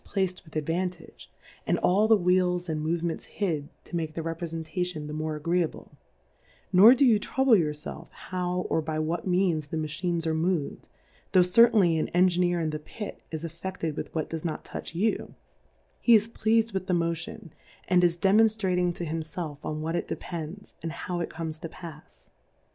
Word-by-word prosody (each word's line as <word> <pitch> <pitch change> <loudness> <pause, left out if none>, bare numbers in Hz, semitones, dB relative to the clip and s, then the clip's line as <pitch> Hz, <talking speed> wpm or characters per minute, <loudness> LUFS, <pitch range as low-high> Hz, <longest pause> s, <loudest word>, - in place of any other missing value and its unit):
9 - - -22
placed 190 -2 -1
with 155 -3 -17
Advantage, 165 +2 -3 0.4
and - - +2
all 205 +4 +3
the 220 -1 +6
Wheels 180 -1 +2
and 155 -2 -2
Movements 165 +1 -2
hid, 160 -8 -2
to - - -8
make 160 -2 -2
,the 165 - -3
Reprefentation 165 0 -3
the 150 - -6
more 155 0 -2
agreeable: 170 +2 -1 0.8
Nor 210 +7 +9
do 275 - +4
you 225 -4 +5
trouble 265 +2 +3
your 160 -6 +2
felf 155 +2 -8
how, 180 -1 -3
or 160 - +1
by 155 0 -3
what 160 +4 -2
Means 180 -5 +1
the 160 - -4
Machines 165 +2 -2
are 160 - +1
mov'd, 160 -2 -1 0.4
tho' 185 - +7
certainly 180 -3 +5
an - - 0
Engineer 180 -1 +3
in 160 -2 -1
the 155 - -4
Pit 210 +7 -8
is 160 0 -5
afFe£ted 165 -1 -4
with - - -5
what 155 - -1
does 160 -1 -5
not 160 -3 -4
touch - - -7
you; 215 +6 -1 0.6
he 235 - +6
is 215 0 +4
pleasM 225 -1 +1
with 190 -1 -3
the 180 - +2
Mo 170 0 +1
tion, 165 0 -9 0.3
and 180 -1 +4
is 170 -1 +3
demonftrating 190 -3 +3
to, 175 - -4
himfelf 160 -1 -4
on 155 0 -3
what 165 +2 -2
it - - -2
depends, 170 +3 -6
and 165 - -3
how 175 0 -4
it 170 - -2
comes 160 -1 -5
to 165 - -6
pafs. 160 -3 -12
170 Hz, 185 wpm, -27 LUFS, 160-185 Hz, 0.8 s, Nor